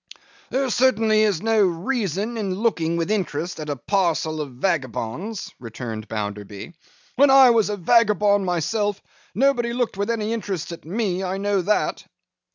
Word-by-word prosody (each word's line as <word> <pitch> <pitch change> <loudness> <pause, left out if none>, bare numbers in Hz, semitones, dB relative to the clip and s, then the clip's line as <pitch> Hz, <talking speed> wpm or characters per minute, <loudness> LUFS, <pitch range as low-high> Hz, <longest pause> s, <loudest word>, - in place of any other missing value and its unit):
'There 265 +1 0
certainly 225 -4 +3
is 205 -5 +1
no 225 -1 +2
reason 200 - -1
in 200 -4 -2
looking 175 -6 0
with 170 +4 -1
interest 175 -5 -2
at 150 -1 -6
a 145 - -1
parcel 160 - 0
of 145 - -5
vagabonds,' 155 - -3
returned 115 -2 -7
Bounderby. 105 - -6 0.4
'When 280 +2 +6
I 265 -2 +8
was 225 -3 +2
a 205 - -2
vagabond 210 0 +3
myself, 195 +4 -1 0.4
nobody 240 -2 +2
looked 245 -5 -2
with 200 +2 -2
any 225 -1 -1
interest 195 -7 -4
at 170 - -9
me; 190 0 -2
I 190 +1 -2
know 200 -1 0
that. 210 +4 0
195 Hz, 155 wpm, -22 LUFS, 165-225 Hz, 0.4 s, I